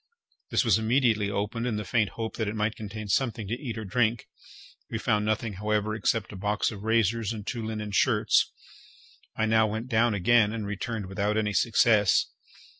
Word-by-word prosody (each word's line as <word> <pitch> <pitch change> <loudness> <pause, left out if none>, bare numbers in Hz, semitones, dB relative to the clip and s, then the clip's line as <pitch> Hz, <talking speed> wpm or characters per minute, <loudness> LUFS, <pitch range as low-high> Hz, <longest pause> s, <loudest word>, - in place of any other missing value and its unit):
This - - +1
was - - +4
immediately 110 -3 +2
opened 105 +4 -2
in 115 - -1
the 105 0 -4
faint 105 +2 +1
hope 115 -1 -4
that 110 - -1
it 105 - -3
might 105 +1 -1
contain 110 0 -7
something 115 0 0
to 110 - -3
eat 120 -6 -5
or 110 - -5
drink. 115 +2 0 0.6
We 115 - -3
found 105 -2 0
nothing, 110 0 -1
however, 105 0 0
except 110 0 -1
a - - -8
box 105 +4 -1
of 100 -3 -8
razors 115 0 +1
and 105 -3 -6
two 115 -1 -4
linen 110 -1 -4
shirts. 105 0 +2 0.9
I 110 - +1
now 110 0 +3
went 110 +4 -4
down 115 -2 +2
again, 105 +2 +3
and 110 -2 -4
returned 105 +1 -4
without 100 +3 -1
any 105 -1 0
success. 105 -2 +3
110 Hz, 190 wpm, -27 LUFS, 105-115 Hz, 0.9 s, was